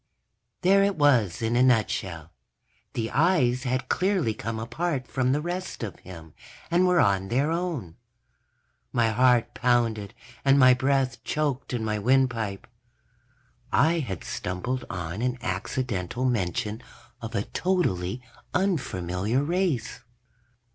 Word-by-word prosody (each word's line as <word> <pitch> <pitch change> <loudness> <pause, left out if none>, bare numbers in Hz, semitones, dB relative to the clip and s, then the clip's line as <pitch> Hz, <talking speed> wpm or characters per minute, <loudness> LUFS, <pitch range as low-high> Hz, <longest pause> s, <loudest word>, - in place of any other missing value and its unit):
_ - - -53
There 195 +2 +5
it 200 -1 +1
was 120 - +3
in 115 +1 +1
a 125 - +4
nutshell. 95 - +1 0.6
The 115 -1 -2
eyes 135 -6 +2
had 130 0 -1
clearly 185 - +1
come 115 +1 -4
apart 130 +4 -2
from 130 -1 0
the 145 +2 +1
rest 175 -3 -4
of 100 -6 -6
him 80 -4 -12 0.4
and 180 +2 +4
were 180 -1 +4
on 95 -5 +2
their 135 +8 +1
own. 165 - -3 0.9
My 115 -2 +2
heart 125 +1 +3
pounded 115 -4 0 0.3
and 135 0 +5
my 130 -2 +7
breath 130 0 0
choked 145 -3 -2
in 120 -3 -2
my 105 -1 -1
windpipe. 115 -4 +1 1.1
I 165 +4 +3
had 100 - -4
stumbled 120 +9 -3
on 90 0 -4
an 125 0 0
accidental 100 +3 -3
mention 105 -1 -1 0.4
of 115 0 -6
a 100 - +1
totally 125 - -1 0.3
unfamiliar 120 - 0
race. 170 - -1
125 Hz, 130 wpm, -26 LUFS, 105-145 Hz, 1.1 s, my